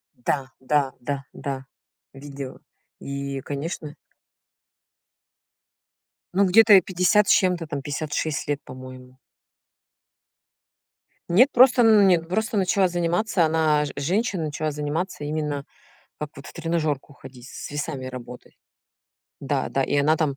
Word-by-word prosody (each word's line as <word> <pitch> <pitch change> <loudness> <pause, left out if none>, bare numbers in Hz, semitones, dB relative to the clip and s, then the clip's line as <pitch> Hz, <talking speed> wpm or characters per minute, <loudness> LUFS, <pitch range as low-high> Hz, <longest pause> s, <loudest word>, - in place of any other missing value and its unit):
Да, 130 +2 -2
да, 135 0 +1
да, 140 +2 -4
да, 135 -1 -5 0.5
видела. 140 -1 -8 0.4
И, 140 0 -4
конечно 150 +1 -5 2.4
Ну, 200 - +4
где-то 215 +3 +7
ей 195 - +9
50 185 +3 +2
с - - +7
чем-то, 180 -3 +2
там 145 -3 -5
56 150 0 -3
лет, 145 -1 -1
по-моему. 130 0 -11 2.1
Нет, 240 +11 +5
просто, 250 0 +6
ну, 220 -2 +6
нет, 175 -4 +3
просто 220 +4 -1
начала 190 0 +2
заниматься 175 +2 +1
она 155 -2 +2
ж 145 - -5
женщина 185 - -1
начала 155 0 -2
заниматься 150 +3 -3
именно 150 -1 -3 0.6
как 150 - -4
вот 140 - -11
в - - -11
тренажёрку 155 -4 -2
ходить, 130 -2 -13
с - - -8
весами 145 -3 -4
работать. 125 -1 -10 0.8
Да - - -1
да, 135 - 0
и 145 - 0
она 150 +3 +3
там, 150 -4 -1
150 Hz, 125 wpm, -24 LUFS, 140-180 Hz, 2.4 s, ей